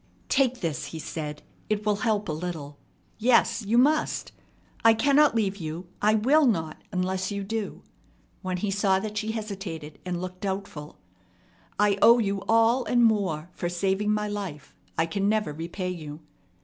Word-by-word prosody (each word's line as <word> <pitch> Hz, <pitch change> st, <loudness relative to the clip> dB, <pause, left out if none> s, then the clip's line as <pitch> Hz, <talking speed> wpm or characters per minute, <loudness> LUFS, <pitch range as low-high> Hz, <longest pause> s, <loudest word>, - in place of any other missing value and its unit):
"Take 260 Hz, -2 st, +2 dB
this," 160 Hz, -6 st, -2 dB
he 165 Hz, -, -7 dB
said. 150 Hz, -1 st, -5 dB, 0.3 s
"It 210 Hz, 0 st, -1 dB
will 210 Hz, -1 st, +2 dB
help 210 Hz, -2 st, 0 dB
a -, -, -1 dB
little. 155 Hz, -3 st, -5 dB, 0.4 s
Yes, 230 Hz, 0 st, +3 dB
you 220 Hz, +3 st, +1 dB
must! 300 Hz, +5 st, +2 dB, 0.5 s
I 225 Hz, 0 st, +7 dB
cannot 280 Hz, +4 st, +4 dB
leave 200 Hz, -3 st, 0 dB
you 165 Hz, 0 st, -6 dB
I 215 Hz, +1 st, +4 dB
will 275 Hz, +7 st, +4 dB
not 160 Hz, -9 st, -1 dB
unless 185 Hz, 0 st, -1 dB
you 200 Hz, -1 st, -3 dB
do," 215 Hz, +1 st, -4 dB, 0.6 s
when 185 Hz, -1 st, -2 dB
he 195 Hz, +2 st, -1 dB
saw 195 Hz, -1 st, +2 dB
that 210 Hz, +2 st, -4 dB
she 220 Hz, +1 st, -2 dB
hesitated 195 Hz, -9 st, -6 dB
and 180 Hz, -1 st, -3 dB
looked 185 Hz, 0 st, -7 dB
doubtful. 190 Hz, -6 st, -5 dB, 0.8 s
"I 205 Hz, -1 st, +3 dB
owe 235 Hz, +1 st, +8 dB
you 200 Hz, -4 st, 0 dB
all 230 Hz, +3 st, +4 dB
and 240 Hz, -1 st, +3 dB
more 185 Hz, -7 st, 0 dB
for 175 Hz, -, -3 dB
saving 195 Hz, +4 st, 0 dB
my 210 Hz, 0 st, 0 dB
life. 195 Hz, -8 st, -6 dB, 0.2 s
I 165 Hz, -, +3 dB
can 200 Hz, +4 st, 0 dB
never 215 Hz, -7 st, 0 dB
repay 170 Hz, +4 st, -4 dB
you. 155 Hz, -3 st, -7 dB
200 Hz, 165 wpm, -26 LUFS, 175-220 Hz, 0.8 s, owe